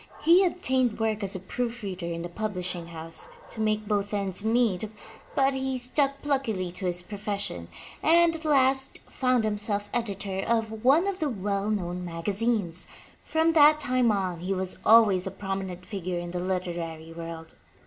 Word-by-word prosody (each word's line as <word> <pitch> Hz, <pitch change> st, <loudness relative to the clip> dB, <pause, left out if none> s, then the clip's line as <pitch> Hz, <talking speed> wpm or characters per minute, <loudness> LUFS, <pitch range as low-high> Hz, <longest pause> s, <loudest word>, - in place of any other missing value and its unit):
He 345 Hz, +4 st, +6 dB
obtained 260 Hz, -, +1 dB
work 220 Hz, -1 st, 0 dB
as 195 Hz, -1 st, -1 dB
a -, -, -3 dB
proof 240 Hz, +5 st, -4 dB
reader 185 Hz, -3 st, -4 dB
in 170 Hz, 0 st, -4 dB
a -, -, -3 dB
pub 210 Hz, +4 st, -4 dB
lishing 180 Hz, -2 st, -3 dB
house, 165 Hz, -1 st, -5 dB, 0.2 s
to 220 Hz, -, -6 dB
make 215 Hz, -1 st, 0 dB
both 205 Hz, 0 st, 0 dB
ends 195 Hz, -1 st, -1 dB
meet, 220 Hz, -3 st, +1 dB, 0.5 s
but 270 Hz, 0 st, +3 dB
he 265 Hz, 0 st, -1 dB
stuck 275 Hz, +3 st, +1 dB
pluckily 230 Hz, -11 st, 0 dB
to 185 Hz, +1 st, -3 dB
his 175 Hz, 0 st, 0 dB
profession 200 Hz, -, -4 dB, 0.3 s
and 335 Hz, +1 st, +5 dB
at 320 Hz, -, -7 dB
last 270 Hz, -3 st, +3 dB
found 255 Hz, -3 st, +1 dB
himself 205 Hz, -1 st, -1 dB
editor 200 Hz, -4 st, -2 dB
of 220 Hz, -1 st, -1 dB
one 285 Hz, +8 st, +5 dB
of 395 Hz, -1 st, -2 dB
the 310 Hz, -3 st, 0 dB
well 200 Hz, -2 st, -2 dB
known 180 Hz, -4 st, -2 dB
magazines. 185 Hz, +1 st, 0 dB, 0.4 s
From 320 Hz, +1 st, +2 dB
that 305 Hz, -1 st, +7 dB
time 250 Hz, -4 st, +2 dB
on 185 Hz, -4 st, -1 dB
he 185 Hz, +3 st, -2 dB
was 185 Hz, 0 st, -2 dB
always 210 Hz, -5 st, +5 dB
a -, -, -1 dB
prominent 190 Hz, -2 st, -5 dB
figure 185 Hz, -3 st, -4 dB
in 175 Hz, 0 st, -5 dB
the 180 Hz, -, -3 dB
literary 170 Hz, -3 st, -4 dB
world. 165 Hz, -1 st, -8 dB
205 Hz, 170 wpm, -27 LUFS, 180-250 Hz, 0.5 s, that